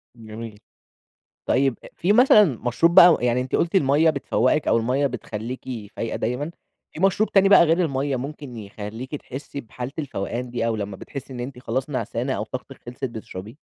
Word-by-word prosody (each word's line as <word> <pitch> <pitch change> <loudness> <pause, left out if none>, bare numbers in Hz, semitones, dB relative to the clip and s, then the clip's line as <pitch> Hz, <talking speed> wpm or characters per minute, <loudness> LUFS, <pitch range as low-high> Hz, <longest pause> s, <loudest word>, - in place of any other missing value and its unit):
جميل. 110 -1 -9 0.9
طيب، 135 -2 +2 0.2
في 185 +4 +2
مثلًا 240 -2 +7
مشروب 135 - +1
بقى 175 -2 +9
يعني 120 0 +1
أنتِ 130 - -1
قلتِ 170 +3 0
المَيَّة 150 -1 +4
بتفوّقك 140 0 +1
أو - - +4
المَيَّة 130 +5 +1
بتخليكِ 120 0 -5 0.3
فايقة 115 - -3
دايمًا، 125 +7 -2 0.4
في - - -8
مشروب 195 +3 +2
تاني 195 0 +5
بقى 195 -3 +8
غير 170 +2 +2
المَيَّة 135 -2 -1
ممكن 140 -1 -7
يخليكِ 110 +5 -7
تحسي 140 0 -7
بحالة 125 +2 -7
الفوقان 125 -3 -4
دي 120 -1 -1
أو 115 -1 0
لما 100 -2 -5
بتحسي 135 +3 -8
إن 125 - -6
أنتِ 125 +1 -6
خلاص 130 +4 -3
نعسانة 125 +1 -2
أو 105 - -2
طاقتِك 130 +3 -8
خلصت، 125 +2 -7
بتشربيه؟ 110 -3 -7
130 Hz, 170 wpm, -23 LUFS, 115-145 Hz, 0.9 s, بقى